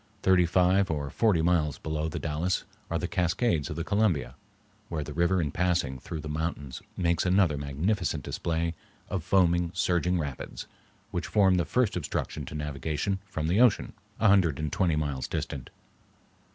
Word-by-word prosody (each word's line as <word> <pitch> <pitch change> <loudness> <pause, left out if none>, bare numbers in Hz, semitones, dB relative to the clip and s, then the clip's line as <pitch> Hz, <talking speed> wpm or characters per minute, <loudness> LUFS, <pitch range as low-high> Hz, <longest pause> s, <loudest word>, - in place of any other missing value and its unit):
Thirty 90 -2 +5
five 90 +2 +3
or 70 -3 -2
forty 100 -8 +2
miles 80 -4 +2
below 80 0 -2
the - - -5
Dalles 80 +4 -1 0.3
are - - 0
the - - -2
Cascades 90 - +1
of - - -4
the 85 - -2
Columbia, 90 - +1 0.6
where 80 -3 -2
the 75 - -7
river 85 +3 +2
in 75 -4 -1
passing 85 -8 0
through 80 +5 -6
the 75 - -7
mountains 75 -3 -3 0.2
makes 85 -2 +1
another 90 -4 +3
magnificent 75 - -1
display 85 +3 -2 0.4
of 95 -4 -2
foaming, 90 -2 +3
surging 90 0 +1
rapids, 75 -5 -5 0.5
which - - -3
form 95 -3 +4
the 85 - +1
first 125 +1 +1
obstruction 75 -3 -3
to 75 - -8
navigation 75 +6 -2
from 80 -6 -3
the 90 +8 +3
ocean, 125 -5 +3 0.3
a 110 - +4
hundred 95 -8 +4
and 75 -1 -3
twenty 90 -5 +2
miles 70 -4 -2
distant. 65 -4 -4
85 Hz, 165 wpm, -28 LUFS, 75-95 Hz, 0.6 s, Thirty